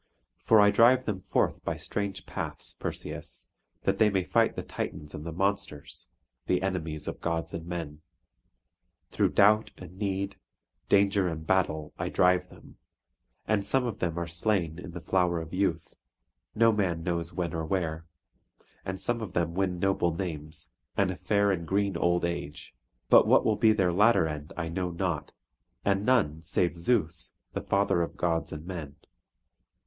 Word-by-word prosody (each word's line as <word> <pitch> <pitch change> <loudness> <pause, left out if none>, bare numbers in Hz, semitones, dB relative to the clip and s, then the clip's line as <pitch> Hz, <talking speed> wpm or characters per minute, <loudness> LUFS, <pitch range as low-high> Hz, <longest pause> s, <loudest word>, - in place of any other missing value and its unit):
For 110 - +6
I 105 0 +6
drive 125 +4 +5
them 100 -4 -2
forth - - 0
by - - -2
strange 100 -2 -4
paths, - - -4
Perseus, - - -6 0.3
that - - +1
they 110 - +6
may 95 -2 +1
fight - - +2
the - - -4
Titans 75 -1 -5
and 75 - -6
the - - -3
monsters, 95 -4 -3 0.4
the 90 0 +1
enemies 80 -5 -3
of - - -5
gods 85 -1 -2
and 85 0 -6
men. 80 -4 -5 1.1
Through - - +1
doubt 105 +2 +5
and 90 +1 -12
need, 100 -1 -2 0.5
danger 100 -1 +4
and 80 -2 -4
battle, 80 -5 0
I - - -1
drive 90 0 +3
them; - - -16 0.7
and 105 -2 +2
some 130 +4 +1
of 115 -4 -4
them 85 -2 -1
are 85 - -1
slain 85 -1 -1
in 90 - -8
the 85 0 -7
flower 90 0 +1
of 80 +1 -8
youth, 90 -4 -1 0.6
no 115 +1 +5
man 90 -6 0
knows 85 -1 -2
when 85 0 -3
or 80 -1 -2
where; 80 -3 -2 0.8
and 95 0 -4
some 120 -1 -1
of 100 -5 -6
them 85 -2 0
win 90 -1 0
noble 90 -3 +1
names, 80 -4 -6 0.3
and 95 -2 +2
a - - -5
fair 100 +2 +2
and 85 -3 -2
green 100 -1 +1
old 85 +1 +2
age; 85 -4 -5 0.4
but - - +7
what - - +5
will - - +3
be 110 - +5
their 95 -5 +2
latter 105 -2 +4
end 75 -1 -6
I 85 -2 -2
know 90 +2 -2
not, 85 -2 -2 0.5
and 100 0 +2
none, 105 -11 +2
save 85 +1 0
Zeus, 85 -2 0 0.2
the - - -2
father 100 -3 +1
of 85 - -3
gods 85 -1 0
and 75 +1 -7
men. 80 -6 -6
90 Hz, 170 wpm, -28 LUFS, 85-100 Hz, 1.1 s, but